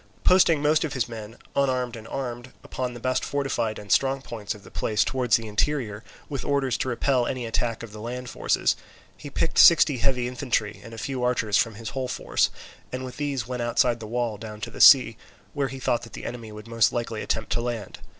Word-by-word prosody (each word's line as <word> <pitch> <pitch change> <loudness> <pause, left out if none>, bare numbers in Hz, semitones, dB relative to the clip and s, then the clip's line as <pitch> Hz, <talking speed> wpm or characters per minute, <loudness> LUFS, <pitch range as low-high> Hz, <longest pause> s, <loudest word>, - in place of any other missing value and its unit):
Posting 165 -5 +5
most 150 +1 +3
of 155 - -3
his 125 -3 0
men, 115 -1 -8 0.2
unarmed 130 -3 +1
and 115 -1 -10
armed, 125 -1 -5
upon 125 -1 -4
the - - -7
best 130 +2 0
fortified 135 -6 -1
and 105 -1 -8
strong 135 0 +3
points 110 -4 -5
of 105 - -14
the - - -14
place 105 -1 +1
towards 125 -3 +2
the 115 -1 -1
interior, 110 -1 -1 0.2
with 140 -3 -4
orders 135 -4 +1
to 130 - -2
repel 125 0 +1
any 125 -2 -3
attack 115 0 -2
of 115 - -8
the 105 0 -9
land 125 +2 -5
forces, - - +1 0.4
he 145 - -9
picked 165 - 0
sixty 155 -4 +7
heavy 125 -1 +1
infantry 120 -4 -2
and 115 -2 -10
a - - -11
few 130 +3 -3
archers 115 -4 +1
from 115 -2 0
his 115 +1 -6
whole 130 -1 -3
force, - - +1 0.4
and 130 0 -4
with 125 -1 -8
these 140 -5 -2
went 125 0 -4
outside 120 0 +2
the 110 - -7
wall 115 -2 -2
down 105 -1 -8
to - - -5
the - - -5
sea, 125 -5 +8 0.4
where 140 -1 0
he 135 0 -7
thought 120 -2 +1
that 115 - -12
the - - -7
enemy 115 -2 -6
would 105 +1 -10
most 115 -1 +3
likely 115 -2 -3
attempt 110 0 -2
to 120 - +1
land. 120 -3 -4
120 Hz, 220 wpm, -25 LUFS, 115-130 Hz, 0.4 s, sea